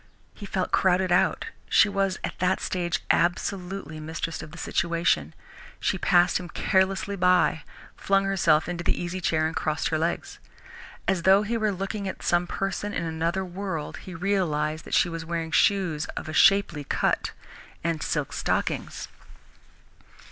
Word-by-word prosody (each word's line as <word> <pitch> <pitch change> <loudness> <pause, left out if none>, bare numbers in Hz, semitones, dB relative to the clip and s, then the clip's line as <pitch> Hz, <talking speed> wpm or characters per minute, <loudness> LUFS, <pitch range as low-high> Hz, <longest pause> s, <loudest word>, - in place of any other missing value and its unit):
He 205 - -9
felt 185 -1 -2
crowded 185 0 +2
out. 175 - +2 0.2
She - - +6
was, 195 -2 0
at - - -5
that 185 +1 +2
stage, 175 -2 -2
absolutely 180 -2 -1
mistress 160 +1 -4
of - - -9
the 170 - -11
situation.... 165 - 0 0.4
She 190 - 0
passed 175 0 +4
him 180 -1 -8
carelessly 190 +3 +1
by, 180 -3 +3 0.3
flung 195 0 +1
herself 170 -5 +3
into 175 -1 -4
the - - 0
easy 175 +1 -4
chair 155 -2 +1
and 160 - -2
crossed 155 0 -1
her 155 - 0
legs. 395 - -2 0.7
As 190 -3 +1
though 190 +3 +5
he 225 +3 -2
were 215 -2 +1
looking 195 +1 -4
at 190 - -6
some 175 0 +2
person 195 +2 -3
in - - -1
another 165 +4 -1
world, 180 -4 -5
he 185 - -9
realized 165 -5 -1
that - - -1
she - - +4
was 165 -1 -5
wearing 165 -1 -3
shoes 180 -8 +2
of 155 - -5
shapely 195 -7 +4
cut, - - 0 0.5
and 165 -2 -1
silk 150 -4 -2
stockings. - - -2
175 Hz, 155 wpm, -26 LUFS, 165-195 Hz, 0.7 s, She